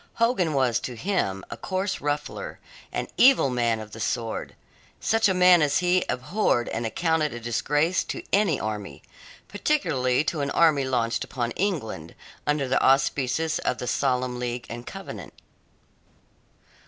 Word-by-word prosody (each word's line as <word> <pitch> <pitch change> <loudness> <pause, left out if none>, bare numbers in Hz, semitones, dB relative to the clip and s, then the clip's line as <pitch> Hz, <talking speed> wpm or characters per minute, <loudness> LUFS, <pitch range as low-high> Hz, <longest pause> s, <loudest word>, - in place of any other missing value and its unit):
Hogan 230 - +1
was 125 -4 +2
to 125 - -6
him 110 - -1
a - - -5
coarse 190 +1 -2
ruffler; 145 +1 -3 0.3
an - - -3
evil 250 - +6
man 120 -2 +1
of 110 -1 -9
the 110 - -9
sword; 115 +1 -3 0.4
such 220 -1 +2
a - - +2
man 180 -1 +6
as 145 -2 +2
he 180 0 +2
abhorred 125 - 0
and 115 0 -2
accounted 160 +1 0
a - - -5
disgrace 145 +9 0
to - - -5
any 195 -7 +3
army 105 -9 -5 0.4
particularly 140 - +1
to 155 0 -2
an 140 - -1
army 150 -3 +3
launched 115 -3 0
upon 120 -2 -3
England 125 - -3 0.3
under 145 -2 +1
the 130 - +2
auspices 135 +3 +2
of 125 - -1
the - - -5
Solemn 125 -1 0
League 120 0 -3
and 120 +1 -7
Covenant. - - -8
135 Hz, 150 wpm, -25 LUFS, 120-175 Hz, 0.4 s, evil